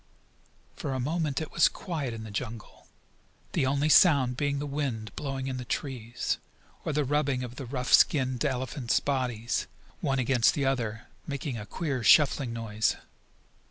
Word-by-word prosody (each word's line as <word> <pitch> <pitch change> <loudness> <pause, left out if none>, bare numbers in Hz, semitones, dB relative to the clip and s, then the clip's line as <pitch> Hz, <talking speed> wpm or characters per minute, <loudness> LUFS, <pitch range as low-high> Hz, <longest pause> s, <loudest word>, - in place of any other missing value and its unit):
For 135 - -3
a 130 - -2
moment 150 +1 -1
it 155 - -5
was 170 - +5
quiet 155 -9 -4
in 115 -1 -6
the 110 - -8
jungle, 115 0 -6 0.6
the 130 - +1
only 140 +2 +1
sound 140 -6 +6
being 145 +1 0
the 145 - -3
wind 135 -7 -3
blowing 135 -2 -3
in 130 -1 -3
the 125 - -5
trees, 120 -3 -3 0.4
or - - -1
the 150 0 +1
rubbing 140 -2 0
of 125 0 -8
the 135 - -6
rough 125 0 -2
skinned 130 -4 +4
elephants' 130 -2 0
bodies, 125 -5 -1 0.3
one 135 -1 0
against 125 -2 +3
the 140 - 0
other, 115 -4 -1 0.2
making 140 -2 -3
a 105 - -8
queer, 140 -8 -3
shuffling 135 +3 +5
noise. 110 -2 0
130 Hz, 160 wpm, -28 LUFS, 120-145 Hz, 0.6 s, sound